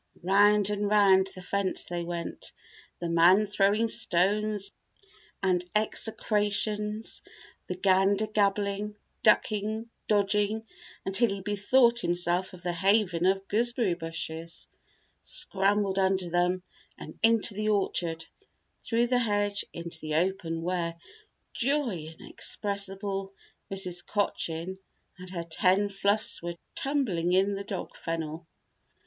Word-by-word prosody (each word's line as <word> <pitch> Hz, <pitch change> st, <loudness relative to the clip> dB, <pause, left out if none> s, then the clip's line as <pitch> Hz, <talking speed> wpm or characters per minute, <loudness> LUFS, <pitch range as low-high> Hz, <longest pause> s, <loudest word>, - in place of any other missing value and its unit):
Round 205 Hz, +2 st, +4 dB
and 205 Hz, 0 st, -1 dB
round 195 Hz, -2 st, +5 dB
the 185 Hz, -, -10 dB
fence 195 Hz, +1 st, -1 dB
they 175 Hz, -1 st, -4 dB
went, 170 Hz, 0 st, -5 dB, 0.5 s
the 175 Hz, -, -3 dB
man 175 Hz, +5 st, +5 dB
throwing 205 Hz, +2 st, +2 dB
stones 205 Hz, +1 st, +1 dB, 0.7 s
and 180 Hz, -2 st, +2 dB
execrations; 210 Hz, 0 st, 0 dB, 0.5 s
the 180 Hz, -, -3 dB
gander 195 Hz, +3 st, +3 dB
gabbling, 205 Hz, 0 st, 0 dB, 0.3 s
ducking, 215 Hz, +1 st, +1 dB, 0.2 s
dodging 210 Hz, +1 st, +1 dB, 0.4 s
until 205 Hz, +5 st, +2 dB
he 195 Hz, 0 st, -3 dB
bethought 235 Hz, +5 st, +3 dB
himself 175 Hz, -1 st, 0 dB
of 180 Hz, -1 st, -12 dB
the 175 Hz, 0 st, -1 dB
haven 185 Hz, -1 st, +2 dB
of 195 Hz, +1 st, +1 dB
gooseberry 235 Hz, -2 st, +2 dB
bushes, 165 Hz, 0 st, -5 dB, 0.5 s
scrambled 195 Hz, 0 st, +1 dB
under 190 Hz, -2 st, +1 dB
them 180 Hz, +1 st, +1 dB, 0.3 s
and -, -, -10 dB
into 225 Hz, -1 st, +3 dB
the 215 Hz, +2 st, -1 dB
orchard, 170 Hz, -5 st, -1 dB, 0.6 s
through 235 Hz, +1 st, +1 dB
the 250 Hz, 0 st, +2 dB
hedge 205 Hz, -3 st, 0 dB
into 170 Hz, -1 st, -6 dB
the 155 Hz, -1 st, -4 dB
open 165 Hz, -1 st, -1 dB
where, 170 Hz, -1 st, -2 dB, 0.6 s
joy 235 Hz, -, -1 dB
inexpressible, 195 Hz, -1 st, -3 dB, 0.4 s
Mrs. 180 Hz, -2 st, -1 dB
Cochin 190 Hz, -3 st, -2 dB, 0.4 s
and 185 Hz, 0 st, -9 dB
her 175 Hz, -2 st, -4 dB
ten 185 Hz, +5 st, +2 dB
fluffs 200 Hz, +3 st, +1 dB
were 170 Hz, 0 st, -5 dB, 0.2 s
tumbling 210 Hz, -, 0 dB
in 195 Hz, +2 st, +3 dB
the 200 Hz, 0 st, -4 dB
dog 200 Hz, -2 st, -6 dB
fennel. 165 Hz, 0 st, -5 dB
195 Hz, 115 wpm, -28 LUFS, 175-210 Hz, 0.7 s, round